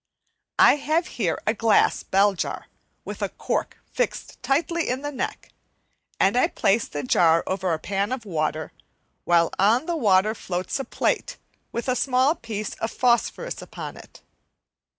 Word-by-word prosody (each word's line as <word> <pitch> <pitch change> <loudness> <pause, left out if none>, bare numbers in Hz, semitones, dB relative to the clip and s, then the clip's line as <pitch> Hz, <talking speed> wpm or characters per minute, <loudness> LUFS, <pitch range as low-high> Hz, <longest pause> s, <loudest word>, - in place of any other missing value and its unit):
I - - +7
have 315 +4 0 0.2
here 175 -5 +1
a 215 - +2
glass 225 0 +3
bell 200 +1 +3
jar, 185 - -4 0.4
with - - -7
a - - 0
cork - - -3 0.2
fixed - - -3
tightly 335 +4 0
in 255 +3 -2
the 290 - -3
neck, 270 - -5 0.7
and 195 - +3
I 250 - +4
place 205 +3 +1
the 145 -1 -5
jar 165 +5 +4
over 190 -1 -1
a 160 - +1
pan 200 +5 -2
of 260 -3 -4
water, 155 -3 -2 0.5
while 170 -1 +3
on 225 +9 +4
the 345 0 -1
water 210 -6 +3
floats 185 +5 -3
a 270 - -3
plate - - -1 0.3
with 235 - -4
a 255 - +2
small 260 +3 +2
piece 220 -8 -5
of 225 - -2
phosphorus 250 - 0
upon - - -8
it. - - -15
220 Hz, 160 wpm, -24 LUFS, 190-270 Hz, 0.7 s, I